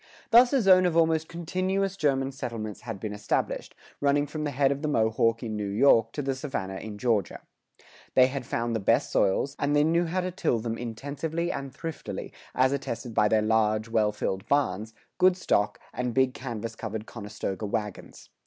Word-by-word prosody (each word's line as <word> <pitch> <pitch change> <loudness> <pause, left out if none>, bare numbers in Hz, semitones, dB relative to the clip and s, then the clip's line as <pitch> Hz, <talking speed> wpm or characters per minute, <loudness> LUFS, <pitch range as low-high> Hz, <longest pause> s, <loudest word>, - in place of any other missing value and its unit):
Thus 240 +2 +7
a 270 -5 +2
zone 185 -1 +6
of 170 -2 0
almost 160 -1 +2
continuous 185 +3 -1
German 135 -6 +1
settlements 115 -6 -5
had 115 -3 -6
been 105 +1 -4
established, 105 0 -2 0.2
running 145 0 +2
from 150 +1 -4
the - - 0
head 140 0 +2
of 140 0 -2
the 155 - -1
Mohawk 115 -3 +2
in 110 -2 -3
New 105 -1 -2
York 115 +2 +4
to 145 - -3
the 135 0 0
Savannah 130 -9 -4
in 105 0 -7
Georgia. 105 -4 0 0.7
They 130 - +7
had 130 0 -3
found 115 -1 -2
the - - 0
best 100 - +2
soils, 135 +8 +1
and 145 +1 +1
they 145 - +5
knew 170 +2 +2
how 185 +3 -1
to 180 0 -3
till 170 -9 0
them 115 0 -3
intensively 145 +9 -3
and 135 -1 -5
thriftily, 165 +4 -6 0.2
as 130 +1 +4
attested 120 -4 -4
by 105 -1 +4
their 110 0 +2
large, 110 0 +1
well 110 -2 +2
filled 95 -2 -3
barns, 110 -6 0 0.2
good 185 0 +5
stock, 105 - +1
and 125 -2 -2
big 130 -1 +3
canvas 115 -3 -5
covered 110 -1 -5
Conestoga 105 -2 -5
wagons. 105 -1 -5
125 Hz, 190 wpm, -27 LUFS, 110-150 Hz, 0.7 s, Thus